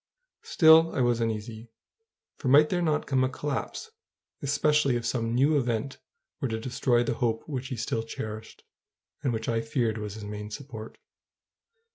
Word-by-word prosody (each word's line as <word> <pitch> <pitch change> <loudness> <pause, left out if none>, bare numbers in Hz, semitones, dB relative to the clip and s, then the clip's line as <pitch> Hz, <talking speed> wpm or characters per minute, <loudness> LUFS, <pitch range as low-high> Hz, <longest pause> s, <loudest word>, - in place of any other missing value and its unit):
Still, 160 0 +5
I - - +1
was 120 -1 +2
uneasy; 110 +1 -4 0.7
for 135 - -6
might 150 +4 +6
there 180 -1 0
not 155 -3 +1
come 130 -1 +1
a 130 - +1
collapse, 145 - -4 0.5
especially 145 -1 +2
if 120 -1 -2
some 115 -1 -1
new 145 +4 +4
event 120 +1 -2 0.4
were 135 - -1
to 110 -2 -3
destroy 120 0 +1
the - - -1
hope 115 -2 0
which 130 -4 -4
he 130 - -4
still 115 0 -2
cherished, 110 -1 -7 0.6
and 135 -4 0
which 110 -1 -3
I 115 -1 +1
feared 115 -1 -1
was 105 -1 -5
his 110 - -8
main 105 0 -6
support? 110 -2 -8
120 Hz, 165 wpm, -27 LUFS, 110-140 Hz, 0.7 s, might